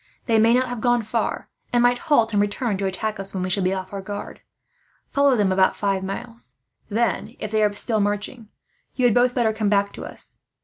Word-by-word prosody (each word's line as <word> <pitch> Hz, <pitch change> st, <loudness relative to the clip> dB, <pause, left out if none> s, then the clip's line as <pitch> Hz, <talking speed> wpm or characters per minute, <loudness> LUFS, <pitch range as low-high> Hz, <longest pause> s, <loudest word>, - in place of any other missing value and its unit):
They 225 Hz, -3 st, +3 dB
may 230 Hz, +2 st, +5 dB
not 255 Hz, +1 st, +2 dB
have 245 Hz, -2 st, -5 dB
gone 240 Hz, 0 st, +2 dB
far, 225 Hz, +2 st, -2 dB, 0.2 s
and 240 Hz, 0 st, +3 dB
might 245 Hz, 0 st, +3 dB
halt 260 Hz, -9 st, +2 dB
and 205 Hz, -, +3 dB
return 205 Hz, +2 st, -1 dB
to 195 Hz, 0 st, -1 dB
attack 215 Hz, +2 st, -3 dB
us, 195 Hz, 0 st, -5 dB
when 185 Hz, -, -1 dB
we 185 Hz, -, -2 dB
shall 195 Hz, -, +2 dB
be 185 Hz, 0 st, +1 dB
off 190 Hz, 0 st, -4 dB
our 200 Hz, -, -4 dB
guard. 205 Hz, +1 st, -7 dB, 0.7 s
"Follow 280 Hz, -2 st, +3 dB
them 205 Hz, -4 st, +2 dB
about 185 Hz, 0 st, +3 dB
five 195 Hz, -2 st, -1 dB
miles; 230 Hz, +5 st, -6 dB, 0.3 s
then, 230 Hz, +2 st, -1 dB
if 215 Hz, -, -5 dB
they 215 Hz, -1 st, +2 dB
are 210 Hz, -, +3 dB
still 215 Hz, +2 st, 0 dB
marching, 205 Hz, +3 st, -2 dB, 0.5 s
you 255 Hz, -, +1 dB
had 240 Hz, -, +5 dB
both 245 Hz, +1 st, +3 dB
better 230 Hz, -3 st, +2 dB
come 215 Hz, -1 st, 0 dB
back 200 Hz, -1 st, +2 dB
to -, -, -8 dB
us. -, -, -9 dB
215 Hz, 225 wpm, -23 LUFS, 200-240 Hz, 0.7 s, may